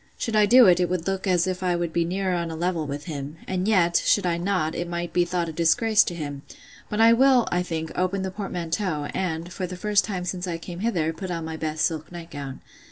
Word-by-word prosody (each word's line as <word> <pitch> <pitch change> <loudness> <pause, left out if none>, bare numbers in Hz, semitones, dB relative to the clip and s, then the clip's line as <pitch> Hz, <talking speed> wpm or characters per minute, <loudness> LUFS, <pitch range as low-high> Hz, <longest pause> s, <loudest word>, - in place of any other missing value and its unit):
Should 225 - -2
I 210 -1 +5
do 250 +2 +8
it, 180 -2 +5
it 180 -2 +1
would 180 -2 -2
look 195 +1 -2
as 180 -2 +3
if 185 -1 -3
I 180 -1 +1
would 170 -1 -2
be 170 - +2
nearer 185 +2 -1
on 170 -1 -2
a 160 - -5
level 170 -2 -1
with 145 +1 -5
him: 150 -2 -6
and 185 +1 -1
yet, 175 -5 +3
should 205 - +3
I 175 -1 +1
not, 175 -4 0
it 175 0 -4
might 170 0 -4
be 175 -1 +3
thought 175 -1 -1
a - - -4
disgrace 210 +7 +4
to 175 - -4
him: 145 -4 -5 0.5
but 210 - -2
I 225 +1 +7
will, 255 0 +4
I 175 - +1
think, 160 -2 -4
open 185 +1 0
the 190 - -3
portmanteau, 180 -5 -3
and, 170 -1 -3
for 185 0 -3
the 180 0 -7
first 205 +1 +2
time 185 -4 -4
since 180 0 -3
I 170 -2 -2
came 170 +1 -8
hither, 175 -7 0
put 185 +3 -6
on 165 -2 -3
my 160 0 -5
best 155 -1 -1
silk 155 -1 -3
nightgown. 145 -6 -8
175 Hz, 250 wpm, -25 LUFS, 165-190 Hz, 0.5 s, do